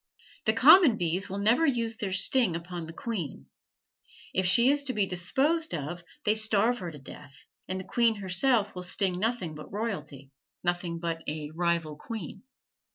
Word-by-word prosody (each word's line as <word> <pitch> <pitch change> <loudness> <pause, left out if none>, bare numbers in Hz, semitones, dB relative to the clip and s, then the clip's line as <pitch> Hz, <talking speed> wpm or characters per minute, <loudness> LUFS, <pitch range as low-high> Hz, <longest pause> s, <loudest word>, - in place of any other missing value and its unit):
The - - +4
common 320 - +7
bees 180 +2 -1
will 195 - -4
never 220 +9 +3
use 235 -6 0
their 200 -4 -3
sting 195 +1 +4
upon 170 -1 -6
the - - -8
queen; 175 - -5 0.9
if 190 -1 +1
she 235 +9 +5
is 285 0 0
to 260 - -1
be 210 -3 +1
disposed 270 - 0
of 170 +3 -6 0.2
they 210 - +4
starve 220 +2 +1
her 180 -3 -5
to 155 - -10
death; 135 0 -13 0.2
and 185 0 -3
the - - -6
queen 230 +3 +2
herself 205 +4 +1
will 180 - -6
sting 180 0 -1
nothing 220 -6 -2
but 150 0 -11
royalty 155 - -5 0.3
nothing 175 -1 -2
but 165 -1 -4
a 150 0 -5
rival 165 -2 -1
queen. 200 -1 -7
185 Hz, 170 wpm, -28 LUFS, 170-225 Hz, 0.9 s, common